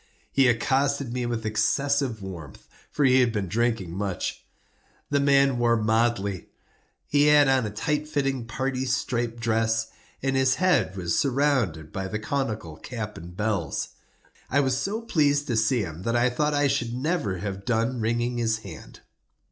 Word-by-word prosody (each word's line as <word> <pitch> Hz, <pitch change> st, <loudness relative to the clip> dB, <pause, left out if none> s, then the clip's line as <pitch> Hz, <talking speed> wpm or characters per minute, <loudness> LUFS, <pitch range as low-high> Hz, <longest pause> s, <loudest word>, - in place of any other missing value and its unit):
He 135 Hz, -1 st, +4 dB
accosted 135 Hz, +2 st, +1 dB
me 125 Hz, -1 st, -2 dB
with 115 Hz, -2 st, -3 dB
excessive 110 Hz, +2 st, 0 dB
warmth, 85 Hz, -8 st, -9 dB, 0.2 s
for 145 Hz, -, +1 dB
he 130 Hz, 0 st, +5 dB
had 125 Hz, -2 st, +3 dB
been 105 Hz, -3 st, -2 dB
drinking 110 Hz, -2 st, 0 dB
much. 95 Hz, 0 st, -3 dB, 0.7 s
The 140 Hz, -, +3 dB
man 140 Hz, -2 st, +3 dB
wore 120 Hz, -1 st, +3 dB
motley. 110 Hz, -3 st, 0 dB, 0.6 s
He 145 Hz, 0 st, +3 dB
had 150 Hz, -1 st, +6 dB
on 130 Hz, -4 st, +2 dB
a -, -, -3 dB
tight 150 Hz, +8 st, -2 dB
fitting 135 Hz, -5 st, -1 dB
parti 130 Hz, +2 st, -2 dB
striped 120 Hz, -2 st, -1 dB
dress, 115 Hz, 0 st, 0 dB, 0.3 s
and 135 Hz, 0 st, 0 dB
his 130 Hz, -1 st, +3 dB
head 180 Hz, -, +2 dB
was 85 Hz, -2 st, 0 dB
surmounted 130 Hz, -, 0 dB
by 95 Hz, -1 st, -3 dB
the 110 Hz, -, -3 dB
conical 110 Hz, -, -3 dB
cap 105 Hz, -1 st, -6 dB
and 90 Hz, +2 st, -10 dB
bells. 105 Hz, -8 st, -1 dB, 0.6 s
I 140 Hz, -, +2 dB
was 130 Hz, -2 st, +2 dB
so 200 Hz, -, -2 dB
pleased 145 Hz, -10 st, +2 dB
to 120 Hz, -, -1 dB
see 110 Hz, +2 st, +2 dB
him, 85 Hz, -3 st, -6 dB
that 115 Hz, +4 st, -1 dB
I 120 Hz, +1 st, +3 dB
thought 150 Hz, +4 st, 0 dB
I 145 Hz, 0 st, +2 dB
should 120 Hz, -4 st, -1 dB
never 130 Hz, -, -1 dB
have 100 Hz, +1 st, -5 dB
done 120 Hz, +2 st, 0 dB
wringing 120 Hz, +2 st, 0 dB
his 110 Hz, -1 st, +1 dB
hand. 85 Hz, -5 st, -11 dB
120 Hz, 165 wpm, -25 LUFS, 105-135 Hz, 0.7 s, had